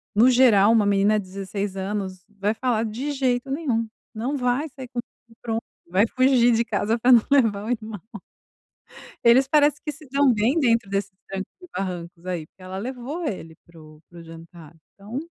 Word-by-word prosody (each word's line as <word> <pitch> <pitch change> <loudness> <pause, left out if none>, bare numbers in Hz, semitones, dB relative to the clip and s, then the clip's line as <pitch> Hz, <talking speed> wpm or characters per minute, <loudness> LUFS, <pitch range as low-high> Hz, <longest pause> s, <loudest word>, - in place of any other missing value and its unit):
No 230 +5 +6
geral 225 -5 +5
uma 225 -2 +4
menina 205 +1 +3
de 200 - -7
16 195 +1 -5
anos 190 -1 -4
vai 205 0 -1
falar: 235 -2 0
"De 240 +7 -4
jeito 260 -2 -1
nenhum, 260 -7 -1 0.3
não 250 +7 -2
vai 250 +4 0
sair 265 -2 -10
comigo 240 0 -5 0.3
e 230 - -20
pronto!". 225 -1 -2 0.3
Vai 190 +6 +2
fugir 255 -1 +4
de 230 +1 +2
casa 220 +1 0
pra 245 +2 +3
não 235 -3 +8
levar 225 -8 +3
o - - -5
irmão. 220 -5 -4 1.2
Eles 245 +3 +6
parece 295 +1 +3
que 300 - -3
se 305 0 -14
dão 275 -1 +4
bem 235 +8 +2
dentro 235 -6 +2
desses 200 0 -2 0.2
trancos 195 0 -6
e 360 - -12
barrancos 175 -2 -5
aí, 175 -4 -3
porque 185 - -25
ela 185 +1 -7
levou 260 - -5
ele 165 - -5
para 170 -1 -17
o 155 0 -16
para 175 - -13
o - - -11
jantar. 165 0 -13 0.2
Então 210 +6 -6
225 Hz, 190 wpm, -24 LUFS, 195-255 Hz, 1.2 s, não